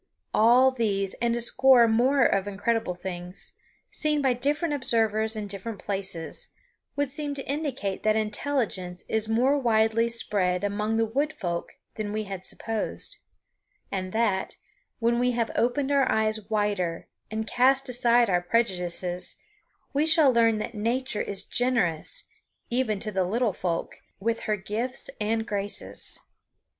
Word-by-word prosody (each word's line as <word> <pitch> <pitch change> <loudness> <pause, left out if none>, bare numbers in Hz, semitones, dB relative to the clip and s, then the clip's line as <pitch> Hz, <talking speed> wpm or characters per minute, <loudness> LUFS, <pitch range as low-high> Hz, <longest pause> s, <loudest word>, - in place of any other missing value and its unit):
All 245 +4 +5
these 200 -6 -1
and 235 0 +1
a - - -1
score 250 0 +5
more 245 +4 +3
of 195 0 +1
incredible 205 -1 -1
things, 180 0 -6 0.4
seen 300 -1 0
by 265 -3 +2
different 295 +6 0
observers 220 -5 +1
in 215 -1 -4
different 200 +2 -5
places, 195 - -3 0.5
would 285 0 0
seem 290 +1 -3
to 270 - -6
indicate 275 -9 -3
that 215 0 +2
intelligence 210 -5 -2
is 220 0 +1
more 255 +6 +3
widely 225 -1 +2
spread 200 -5 0
among 210 +2 -1
the 225 - +2
Wood 285 +8 -1
Folk 170 -4 -4 0.2
than 210 -1 -3
we 215 +1 -2
had 195 -3 -7
supposed; 225 +2 -3 0.7
and 185 -1 -3
that, 220 -3 0 0.4
when 235 +1 +1
we 250 0 +2
have 230 -1 -1
opened 255 +5 +1
our 275 -2 +3
eyes 215 -1 0
wider 205 -6 -1 0.2
and 220 0 -3
cast 265 +5 +3
aside 240 -1 +3
our 180 -3 +2
prejudices, 180 -3 0 0.6
we 295 +3 +2
shall 310 -4 +5
learn 230 -2 +4
that 215 +2 -4
Nature 235 +2 -1
is 200 -1 -2
generous, 240 - +1 0.5
even 240 -4 +1
to 215 +2 -4
the 190 -2 +1
little 220 +3 0
folk, 170 -2 -3 0.2
with 230 +3 -1
her 215 -1 0
gifts 220 +6 -2
and 220 +1 0
graces. 205 -2 +1
225 Hz, 145 wpm, -26 LUFS, 200-250 Hz, 0.7 s, All